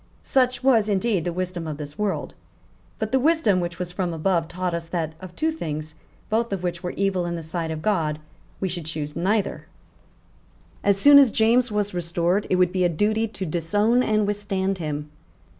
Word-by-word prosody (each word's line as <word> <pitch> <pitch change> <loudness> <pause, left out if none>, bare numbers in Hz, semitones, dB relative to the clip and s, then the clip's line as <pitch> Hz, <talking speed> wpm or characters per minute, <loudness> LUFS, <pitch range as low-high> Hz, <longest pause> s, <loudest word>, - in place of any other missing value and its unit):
Such 255 -2 +1
was 230 -5 +4
indeed 200 -3 +1
the 175 - 0
wisdom 180 -1 -4
of 150 -2 -4
this 145 -1 -8
world. 210 -2 -2 0.6
But 220 -2 -3
the 265 - +3
wisdom 295 - +3
which 170 -1 -3
was 180 -1 -4
from 180 -2 -2
above 165 0 +1
taught 180 0 -3
us 170 -1 -3
that 165 -2 -2
of 180 -1 -10
two 320 +1 0
things, 155 - -5 0.3
both 230 +1 0
of 190 -2 -3
which 175 -1 -2
were 180 - -3
evil 190 -3 0
in 170 - -2
the 165 - -5
sight 160 +1 -3
of 155 -1 -5
God, 165 -8 +1 0.4
we 190 - -1
should 175 -3 -4
choose 150 -2 -4
neither. 200 +3 -1 1.2
As 200 -1 +3
soon 285 +7 +8
as 275 -3 +6
James 230 +3 +3
was 205 -1 -1
restored, 175 +3 0
it - - +3
would 180 -1 +3
be 185 -1 0
a 175 - +3
duty 215 +7 +1
to 200 -3 -5
disown 205 +9 +2
and 215 -3 +2
withstand 195 -2 -1
him. 150 -2 -4
185 Hz, 195 wpm, -24 LUFS, 170-210 Hz, 1.2 s, soon